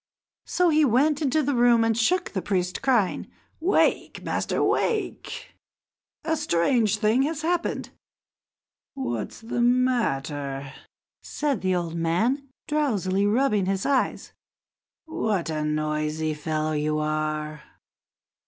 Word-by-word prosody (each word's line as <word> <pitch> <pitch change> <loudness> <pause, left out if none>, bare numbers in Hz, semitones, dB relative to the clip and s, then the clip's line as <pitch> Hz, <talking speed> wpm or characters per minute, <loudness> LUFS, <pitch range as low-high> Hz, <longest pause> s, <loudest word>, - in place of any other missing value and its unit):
So 360 -1 +2
he 310 -1 +4
went 285 +4 +3
into 300 +1 +2
the 285 +1 0
room 240 -2 +4
and 225 0 +2
shook 350 +11 +1
the 190 - -2
priest, 180 -2 -1
crying: 245 -8 +1 0.3
"Wake! 350 +5 +1
Master, - - -1
wake! 440 -3 -1 0.7
A 320 0 0
strange 220 - +2
thing 220 +4 +2
has 305 +2 -1
happened." 345 +1 -1 1.0
"What's 120 - -4
the 235 +1 -2
matter?" 145 - 0 0.5
said 285 -7 -2
the 185 -1 +1
old 170 -2 -2
man, 220 - 0 0.2
drowsily 205 -10 +1
rubbing 210 -4 +2
his 195 0 -1
eyes, 275 -2 0 0.7
"what 215 - -1
a 155 -1 -2
noisy 155 +1 -1
fellow 155 +1 -2
you 150 0 0
are!" 155 0 -2
215 Hz, 115 wpm, -25 LUFS, -, 1.0 s, he